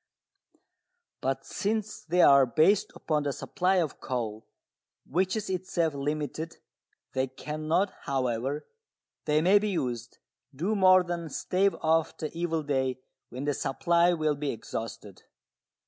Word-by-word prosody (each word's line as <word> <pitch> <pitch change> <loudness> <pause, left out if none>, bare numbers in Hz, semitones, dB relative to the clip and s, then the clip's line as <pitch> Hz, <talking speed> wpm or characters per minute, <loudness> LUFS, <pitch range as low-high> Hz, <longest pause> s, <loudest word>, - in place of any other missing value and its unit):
] 360 -1 -54
But 135 +1 -1
since 215 +1 -2
they 175 +2 +3
are 140 -2 +7
based 185 - +3
upon 155 -2 -1
the 145 -1 -1
supply 185 +7 0
of 165 -6 0
coal, 115 -4 -4 0.6
which 185 - 0
is 215 -1 -3
itself 180 -4 -1
limited, 150 +3 -3 0.6
they 130 0 0
cannot, 155 +8 -1 0.2
however 130 +2 -1 0.6
they 150 0 +3
may 195 +4 +6
be 210 +1 -1
used, 125 - -3 0.4
do 185 +10 0
more 185 -2 +6
than 170 -2 -4
stave 190 +6 +1
off 160 0 +2
the 155 0 -5
evil 165 -2 -1
day 130 -3 0 0.3
when 130 +2 -6
the 145 - +1
supply 170 +6 +2
will 155 -3 +1
be 145 0 -3
exhausted. 110 -4 -6
155 Hz, 135 wpm, -28 LUFS, 135-180 Hz, 0.6 s, are